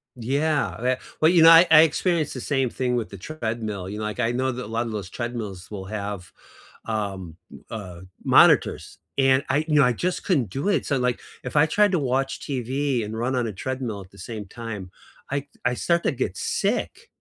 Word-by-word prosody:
Yeah, 140 +6 0
that 130 +1 0 0.2
Well, 155 - +6
you 170 -3 +6
know, 165 - +10
I 165 +2 +8
I 155 0 +9
experienced 165 0 +1
the 130 - -6
same 135 -2 0
thing 125 0 -1
with 115 -3 -2
the 100 - -9
treadmill, 110 - -4
you 105 - -5
know, 110 - -4
like, 105 +2 -4
I 120 -1 +1
know 130 +2 0
that 125 0 -5
a - - -9
lot 115 +2 -1
of 115 - -5
those 100 -4 -5
treadmills 110 -7 -5
will 95 -3 -7
have, 100 -3 -5 0.5
um, 100 -6 -4 0.2
m - - -12
uh, 90 -6 -7 0.2
monitors, - - +4 0.2
and 135 0 +4
I 145 +4 +1
you 150 - +1
know, 150 - +6
I 125 - +3
just 180 +10 -2
couldn't 140 - +1
do 140 - -2
it, 205 - +1
so, 140 - 0
like, 125 -1 0 0.2
if 125 - -6
I 150 +1 +6
tried 205 +4 +3
to 180 - +2
watch 135 0 -1
TV 135 -1 -1
and 110 +1 -5
run 125 +3 -1
on 125 -2 0
a 110 - -5
treadmill 120 -1 -4
at 95 - -14
the 100 - -18
same 110 -2 -7
time, 105 -3 -7 0.4
I 140 +1 -2 0.2
I 125 - +2
start 170 +6 +1
to - - +2
get - - -3
sick. 460 +1 -2
125 Hz, 220 wpm, -24 LUFS, 105-145 Hz, 0.5 s, know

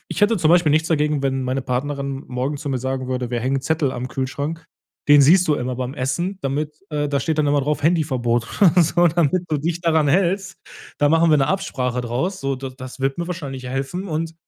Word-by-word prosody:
ich - - -4
hätte 220 +2 +4
zum 155 -2 +2
Beispiel 170 -3 +4
nichts 155 +2 +2
dagegen, 150 -2 +1
wenn 135 -1 0
meine 130 +1 -1
Partnerin 140 +1 -3
morgen 130 +4 -2
zu 145 - -6
mir 130 - -1
sagen 130 +1 -3
würde: 125 -1 -2
„Wir 120 -1 -1
hängen 130 +3 0
Zettel 155 -2 0
am 125 +1 -5
Kühlschrank. 145 +5 -4 0.4
Den 145 -1 +8
siehst 180 +6 +5
du 150 - +3
immer 125 -2 -3
beim 130 0 -3
Essen, 170 +9 -2
damit, 150 +3 -3
äh 145 -1 -1
da 140 -1 0
steht 160 +1 -1
dann 150 - +2
immer 145 0 +2
drauf 145 +1 -1
Handyverbot, 130 -8 +1 0.2
oder 175 -1 +6
so 175 +2 +3
damit 170 +2 +1
du 155 - 0
dich 170 +3 -2
daran 160 -3 +2
hältst. 190 +3 +1 0.4
Da 145 - +3
machen 165 0 +4
wir 150 - +6
'ne 135 -1 +2
Absprache 125 -9 -1
draus.“ 130 +11 -2
So, 135 -1 -1
d 130 0 -6
das 130 0 -9
wird 135 +2 -1
mir 170 - -2
wahrscheinlich 140 -7 -6
helfen 135 +9 -4
und 160 +1 -3
145 Hz, 225 wpm, -21 LUFS, 130-165 Hz, 0.4 s, Den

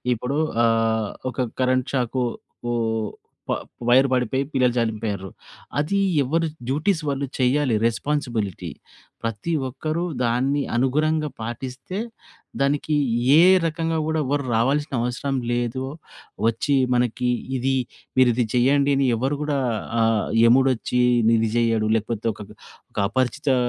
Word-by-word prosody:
ఇప్పుడు 125 +6 -2 0.3
అహ్, 115 -2 +1 0.2
ఒక 125 +1 -2
కరెంట్ 130 0 +1
షాకు 125 -1 0 0.5
ఓహ్! 110 -2 -1 0.4
ప - - +2 0.3
వైర్ 130 +3 +6
పడిపోయి 130 +2 +1
పిల్లలు 125 -2 +3
చనిపోయిర్రు. 105 -4 -2 0.5
అది 165 +7 0 0.2
ఎవర్రి 165 +5 0 0.2
డ్యూటీస్ 160 +6 +1
వాళ్ళు 140 0 -1
చెయ్యాలి 130 -1 +2
రెస్పాన్సిబిలిటీ. 115 - -2 0.5
ప్రతి 115 +8 -3 0.2
ఒక్కరు 155 +6 -3 0.2
దాన్ని 130 +4 +1
అనుగుణంగా 150 +5 +1
పాటిస్తే 130 - -5 0.6
దానికి 145 +2 +1 0.4
ఏ - - +8 0.2
రకంగా 165 0 -1
గూడా 160 0 0
ఎవ్వరు 140 +2 0
రావాల్సినవసరం 130 +1 0 0.2
లేదు. 120 +1 -1 0.6
వచ్చి 115 +5 +1 0.2
మనకి 125 0 +1 0.3
ఇది, 135 +2 0 0.4
మీరిది 125 -1 +4
చేయండి 140 +3 +3
అని 135 - +2
ఎవరు 135 +5 -1
గూడా 150 -1 0 0.4
ఆహ్, 115 -1 +1
యముడొచ్చి 125 0 +3 0.3
నిది 115 -1 +3
చెయ్యడు. 115 -2 +2
లేకపోతే 115 0 -2
ఒకక 105 0 -11 0.4
ఒక - - -19
అపరిచితా 130 +4 0
125 Hz, 115 wpm, -23 LUFS, 115-140 Hz, 0.6 s, ఏ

